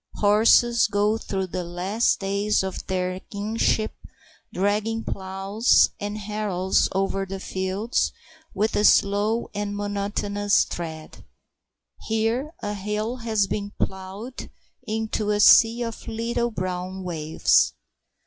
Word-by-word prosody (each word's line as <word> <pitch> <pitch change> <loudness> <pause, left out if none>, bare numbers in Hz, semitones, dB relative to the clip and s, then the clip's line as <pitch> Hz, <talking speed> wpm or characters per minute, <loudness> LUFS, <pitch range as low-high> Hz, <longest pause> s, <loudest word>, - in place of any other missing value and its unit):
Horses 225 +3 +4
go 210 +2 +1
through 190 -3 -3
the 185 0 -4
last 185 +8 0
days 200 +1 +1
of 190 -1 -5
their 185 0 -2
kingship 215 +2 -1 0.6
dragging 210 +4 0
ploughs 195 +4 +2
and 205 +1 -4
harrows 205 -3 0
over 195 0 -1
the 195 0 -6
fields 190 +5 -1 0.4
with 215 +3 0
slow 205 +3 +2
and 205 0 -3
monotonous 205 0 0
tread. 160 -2 -7 0.8
Here 225 +6 0
a 205 0 -2
hill 210 +4 -3
has 220 -4 +1
been 205 +1 -4
ploughed 190 +6 -5 0.4
into 220 -1 -2
a 205 0 +1
sea 230 +3 +6
of 230 -1 -7
little 235 +1 -1
brown 185 -2 -4
waves. 160 -3 +2
205 Hz, 110 wpm, -24 LUFS, 190-220 Hz, 0.8 s, sea